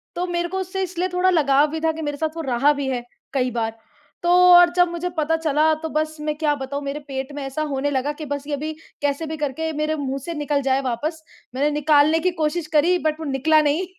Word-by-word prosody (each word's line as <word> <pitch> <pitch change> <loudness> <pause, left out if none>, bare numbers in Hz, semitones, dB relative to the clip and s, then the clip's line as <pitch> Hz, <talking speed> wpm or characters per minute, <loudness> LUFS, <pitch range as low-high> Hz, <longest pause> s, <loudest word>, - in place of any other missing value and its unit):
तो 355 - -1
मेरे 345 0 -1
को 380 - -3
उससे 380 +1 -3
इसलिए 365 0 -2
थोड़ा 365 +1 +3
लगाव 290 -4 +4
भी 320 - -3
था 320 - +2
कि 320 0 -7
मेरे 290 -1 -3
साथ 315 +1 -2
वो - - -2
रहा 270 +2 +3
भी 280 -1 -3
है, 245 -2 -2 0.3
कई 255 -2 0
बार। 225 -1 -3 0.5
तो 345 - +1 0.2
और 350 0 +8
जब 355 0 +5
मुझे 345 +1 -3
पता 315 +1 +1
चला 315 0 +2
तो 320 - -2
बस 310 +1 -1
मैं 300 0 -2
क्या 300 -2 +1
बताऊँ 280 +1 -5
मेरे 280 +2 -4
पेट 265 0 -4
में 290 - -5
ऐसा 270 +3 -4
होने 275 +1 0
लगा 275 +1 0
कि 310 - -5
बस 285 -1 -4
ये 295 - -3
अभी 305 +2 -3 0.3
कैसे 290 +2 -1
भी 315 +1 -5
करके 300 +2 -2
मेरे 305 +1 0
मुँह 275 -2 -3
से 340 - -4
निकल 295 -1 -1
जाए 270 0 +1
वापस। 295 +6 -3 0.3
मैंने 285 +3 +1
निकालने 300 +1 +3
की 365 +2 +1
कोशिश 310 +1 -1
करी 350 +5 +4
बट 310 +1 -1
वो 320 - -5
निकला 310 +4 +3
नहीं 305 +5 +1
300 Hz, 245 wpm, -22 LUFS, 280-320 Hz, 0.5 s, और